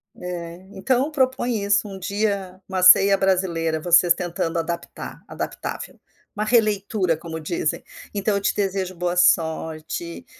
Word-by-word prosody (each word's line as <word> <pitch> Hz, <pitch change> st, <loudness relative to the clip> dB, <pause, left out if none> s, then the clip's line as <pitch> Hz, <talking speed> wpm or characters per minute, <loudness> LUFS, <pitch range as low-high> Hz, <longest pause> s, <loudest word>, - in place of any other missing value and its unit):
É, 175 Hz, 0 st, -7 dB
então 255 Hz, +9 st, 0 dB
propõe 255 Hz, -5 st, 0 dB
isso 205 Hz, +1 st, +2 dB
um 195 Hz, -1 st, -8 dB
dia, 200 Hz, -1 st, -2 dB
uma 190 Hz, -1 st, -2 dB
ceia 195 Hz, +2 st, +8 dB
brasileira 175 Hz, -4 st, 0 dB
vocês 175 Hz, +1 st, +5 dB
tentando 170 Hz, -2 st, -3 dB
adaptar, 170 Hz, +1 st, -5 dB
adaptável, -, -, -6 dB, 0.4 s
uma 210 Hz, -, -1 dB
releitura 210 Hz, -5 st, +1 dB
como 160 Hz, 0 st, -7 dB
dizem, 155 Hz, -1 st, -2 dB, 0.3 s
então 205 Hz, +1 st, 0 dB
eu 200 Hz, -, -1 dB
te -, -, +1 dB
desejo 190 Hz, -2 st, -2 dB
boa 175 Hz, 0 st, -2 dB
sorte, 160 Hz, -1 st, 0 dB
185 Hz, 135 wpm, -22 LUFS, 170-200 Hz, 0.4 s, ceia